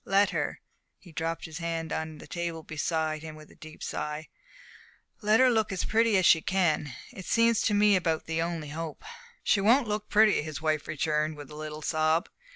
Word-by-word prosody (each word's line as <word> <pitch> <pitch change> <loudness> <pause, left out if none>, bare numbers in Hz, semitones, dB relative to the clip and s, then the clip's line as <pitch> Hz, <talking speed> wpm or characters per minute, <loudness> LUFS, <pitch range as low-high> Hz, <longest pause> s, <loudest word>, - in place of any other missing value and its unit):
Let 200 +1 +3
her" - - -2 0.4
he 175 - -16
dropped 165 +1 -3
his 160 +1 -7
hand 165 -1 -3
on 160 -1 -4
the - - -11
table 170 -2 -4
beside 155 0 -2
him 155 -1 -8
with 155 0 -14
a - - -18
deep 155 0 -11
sigh 150 +1 -4 0.9
"let 215 +1 +4
her 260 -1 +6
look 220 -3 +1
as 190 - -2
pretty 225 -1 +3
as 185 - +2
she 160 - +6
can. 165 -6 +1 0.2
It 185 - -9
seems 230 -1 +3
to 210 - +1
me 205 0 +5
about 165 -3 0
the 160 0 -1
only 165 -3 -3
hope." 160 - -6 0.4
"She 200 - +3
won't 235 +5 +4
look 210 0 -3
pretty," 215 -3 +5
his 155 -1 -6
wife 155 -2 -1
returned, 155 0 -1
with 145 0 -10
a - - -9
little 155 0 -7
sob. 155 +1 +1
165 Hz, 200 wpm, -28 LUFS, 155-200 Hz, 0.9 s, her